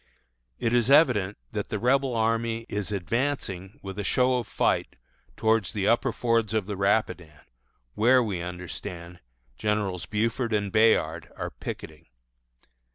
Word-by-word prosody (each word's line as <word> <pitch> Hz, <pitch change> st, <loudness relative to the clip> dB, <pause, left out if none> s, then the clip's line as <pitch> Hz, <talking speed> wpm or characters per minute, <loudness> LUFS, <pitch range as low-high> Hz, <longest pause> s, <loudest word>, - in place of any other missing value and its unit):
It 115 Hz, -, -1 dB
is 120 Hz, 0 st, +3 dB
evident 125 Hz, -, +4 dB
that -, -, -4 dB
the -, -, -2 dB
Rebel 130 Hz, +1 st, +2 dB
army 115 Hz, 0 st, 0 dB
is 105 Hz, 0 st, -3 dB
advancing 100 Hz, -, -2 dB
with 95 Hz, 0 st, -6 dB
a -, -, -1 dB
show 125 Hz, +4 st, +2 dB
of 120 Hz, -, -6 dB
fight -, -, 0 dB, 0.4 s
towards 110 Hz, -3 st, +1 dB
the 100 Hz, -2 st, -1 dB
upper 120 Hz, -, +3 dB
fords 115 Hz, -3 st, 0 dB
of 110 Hz, -3 st, +1 dB
the 105 Hz, 0 st, -4 dB
Rapidan, 95 Hz, -6 st, 0 dB, 0.5 s
where, 125 Hz, -, +4 dB
we 100 Hz, -6 st, -3 dB
understand, 90 Hz, 0 st, -7 dB, 0.4 s
Generals 100 Hz, -4 st, -1 dB
Buford 115 Hz, +2 st, -1 dB
and 100 Hz, -2 st, 0 dB
Bayard 85 Hz, -7 st, +2 dB
are -, -, -5 dB
picketing. 75 Hz, -2 st, -8 dB
105 Hz, 140 wpm, -26 LUFS, 95-115 Hz, 0.5 s, evident